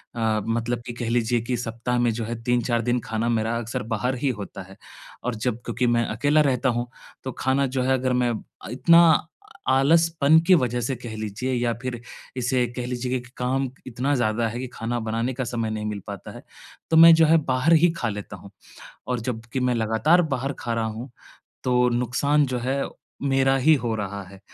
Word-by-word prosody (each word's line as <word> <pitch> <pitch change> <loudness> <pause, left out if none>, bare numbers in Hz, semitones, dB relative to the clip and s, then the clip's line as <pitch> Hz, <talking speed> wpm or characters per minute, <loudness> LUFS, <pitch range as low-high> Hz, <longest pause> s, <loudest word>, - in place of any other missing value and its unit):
अ, 110 -2 0
मतलब 115 +1 -1
कि 120 - -4
कह 120 -1 -4
लीजिए 120 0 +1
कि 125 +1 -2
सप्ताह 120 +1 -2
में 120 -1 +2
जो 115 0 -3
है 115 +1 -5
3-4 120 -1 +1
दिन 125 +1 +1
खाना 115 +1 -1
मेरा 115 0 0
अक्सर 115 0 -4
बाहर 125 +5 -1
ही 140 +2 0
होता 100 0 -7
है। 95 +1 -15 0.5
और 125 -1 -2
जब 115 +1 -2
क्योंकि 120 +1 -1
मैं 120 -1 +2
अकेला 145 +7 +2
रहता 130 -2 +1
हूँ 120 +1 -1 0.4
तो 130 - -4
खाना 135 +1 +1
जो 130 0 -2
है 130 +1 +2
अगर 130 -1 0
मैं 120 - +1 0.4
इतना 170 +7 +5 0.7
आलसपन 160 +2 +4
की 185 - +7
वजह 125 -4 0
से 130 +3 -2
कह 120 -2 -8
लीजिए 110 +5 -3
या 120 -1 0
फ़िर 125 -2 -5 0.4
इसे 125 0 +1
कह 125 - -2
लीजिए 125 0 -3
कि 125 - -14
काम 130 +1 -1 0.2
इतना 130 +4 -1
ज़्यादा 115 -1 0
है 115 +2 -5
कि 130 - -4
खाना 120 +2 -3
बनाने 115 +3 -2
का 130 +1 -3
समय 115 -2 -2
नहीं 110 -1 -4
मिल 105 -2 -4
पाता - - -7
है। - - -11 0.5
तो 160 - +3
मैं 165 0 +10
जो 160 0 +5
है 165 +1 +5
बाहर 130 +5 +2
ही 175 - +6
खा 120 - -1
लेता 105 -1 -6
हूँ। 100 - -14 0.6
और 125 -1 -1
जब 115 -1 -4
कि 130 - 0
मैं 125 -1 +1
लगातार 115 +10 +3
बाहर 135 +2 -2
खा 120 -1 -3
रहा 115 - -1
हूँ, 110 +4 -6 0.6
तो 125 -1 +3
नुकसान 125 +5 +1
जो 125 -1 -2
है 135 +3 -1 0.4
मेरा 135 -1 +2
ही 155 +5 +5
हो 120 -5 -1
रहा 100 -1 -4
है। 95 0 -14
120 Hz, 210 wpm, -24 LUFS, 115-130 Hz, 0.7 s, मैं